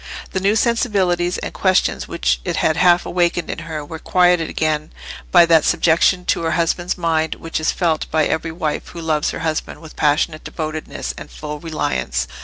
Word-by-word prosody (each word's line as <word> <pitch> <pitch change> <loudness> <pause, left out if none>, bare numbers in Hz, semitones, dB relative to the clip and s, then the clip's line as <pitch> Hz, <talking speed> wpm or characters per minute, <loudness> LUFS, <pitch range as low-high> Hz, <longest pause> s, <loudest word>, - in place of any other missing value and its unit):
The 190 - -1
new 200 +3 +2
sensibilities 195 -7 +1
and - - -5
questions 185 -1 +1
which - - 0
it - - -2
had 155 - +2
half 175 +1 +4
awakened 175 -1 0
in - - -5
her 155 -2 -4
were 160 +2 -8
quieted 180 -2 +2
again 155 -1 -1 0.4
by 175 -2 +7
that 165 -2 +5
subjection 175 +2 +3
to - - +1
her 165 -1 0
husband's 175 +1 0
mind 160 -2 0
which 165 -1 -4
is 155 - +1
felt 165 -4 -1
by 155 -1 +2
every 165 +1 -1
wife 160 -2 -3
who 170 - -9
loves 155 -2 0
her - - -5
husband 155 -1 -3
with 160 -2 -13
passionate 155 +1 +1
devotedness 155 -1 -5
and - - -10
full 150 0 -7
reliance. 65 - -2
165 Hz, 185 wpm, -19 LUFS, 155-175 Hz, 0.4 s, by